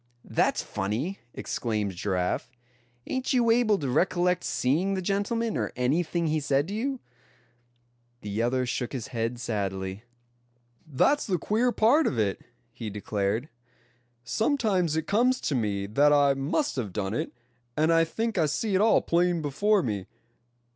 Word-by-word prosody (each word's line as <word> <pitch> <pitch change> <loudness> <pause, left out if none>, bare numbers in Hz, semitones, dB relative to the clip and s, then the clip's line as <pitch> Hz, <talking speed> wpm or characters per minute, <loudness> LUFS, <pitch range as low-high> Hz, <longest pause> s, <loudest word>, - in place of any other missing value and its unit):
"That's - - +1
funny!" 120 - -3 0.2
exclaimed 105 -4 -2
Giraffe. 90 -1 -1 0.6
"Ain't 260 0 -2
you 235 -3 +4
able 225 -3 +3
to 145 - -3
recollect 175 +6 +1
seeing 170 +10 +1
the - - -1
gentleman, 205 +3 -1
or 110 -5 -1
anything 160 +7 0
he 155 0 +1
said 145 +2 0
to - - -4
you?" 260 +5 -2 1.2
The 105 +1 -3
other 125 +2 +1
shook 125 +1 -3
his 125 -5 -5
head 115 0 -2
sadly. 95 -3 -3 0.8
"That's 215 - +2
the 185 -3 +1
queer 225 +8 +1
part 255 +8 +4
of 125 - -1
it," 105 -3 0 0.3
he 110 - -6
declared. 105 +4 -2 0.8
"Sometimes 200 - +1
it 160 -1 -1
comes 245 +7 +2
to 150 - -1
me 105 -5 -1
that 140 +9 +3
I 145 -1 +5
must 140 - -1
have 110 -6 -2
done 100 -1 -2
it, - - -2 0.5
and 155 +2 +3
I 165 0 +5
think 220 +5 -2
I 160 - +3
see 200 +8 -1
it 190 - +3
all 220 - +4
plain 175 0 +2
before 200 +8 +2
me. 105 -6 -3
150 Hz, 155 wpm, -27 LUFS, -, 1.2 s, I